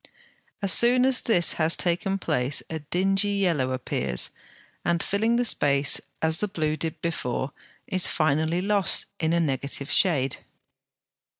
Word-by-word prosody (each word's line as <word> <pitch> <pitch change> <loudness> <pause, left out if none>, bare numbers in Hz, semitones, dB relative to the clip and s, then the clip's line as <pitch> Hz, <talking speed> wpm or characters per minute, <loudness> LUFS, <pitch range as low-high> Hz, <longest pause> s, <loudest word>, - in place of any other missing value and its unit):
As 195 - +6
soon 250 +2 +5
as 265 -1 +3
this 175 -7 +2
has 160 +1 +1
taken 180 +3 -1
place 145 -6 -1
a 160 - -4
dingy 195 +6 0
yellow 170 -10 0
appears, 65 - -1 0.5
and, 170 -1 0
filling 220 +4 0
the 245 +1 0
space 140 -8 +2 0.2
as 160 0 +2
the 210 - -1
blue 155 -6 -2
did 160 +1 -5
before, 135 -5 -3 0.3
is 185 -1 +3
finally 160 +3 0
lost 200 -2 +1
in 160 -1 -1
a 170 - +1
negative 140 -1 -2
shade. 145 -8 +2
165 Hz, 140 wpm, -24 LUFS, 145-195 Hz, 0.5 s, As